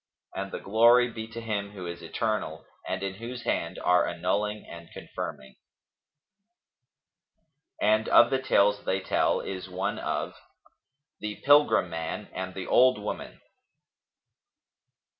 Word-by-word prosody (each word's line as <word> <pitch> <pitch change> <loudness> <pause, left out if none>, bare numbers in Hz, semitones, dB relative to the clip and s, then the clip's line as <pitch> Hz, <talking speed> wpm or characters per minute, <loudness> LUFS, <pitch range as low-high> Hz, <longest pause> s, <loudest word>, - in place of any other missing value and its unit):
And 95 0 -5
the - - -4
glory 120 +4 +4
be 110 -1 -6
to 115 +1 -8
Him 105 -3 -3
who 95 -3 -7
is 85 0 -6
eternal - - -3 0.2
and 95 +1 -3
in 95 -1 -2
whose 120 +4 -7
hand 85 +2 -2
are 90 0 +3
annulling 100 +5 -2
and 85 -1 -11
confirming. 65 -1 -7 2.2
And 110 +1 +2
of 120 - +6
the 135 -1 +1
tales 105 -5 +3
they 95 - 0
tell - - +1
is 95 -1 -6
one 90 +1 -2
of - - -3 0.9
THE 105 -1 -4
PILGRIM 145 -11 +5
MAN 80 0 -5
AND 95 0 -5
THE 95 - -5
OLD 130 0 +5
WOMAN. 105 - -6
100 Hz, 130 wpm, -27 LUFS, 95-115 Hz, 2.2 s, of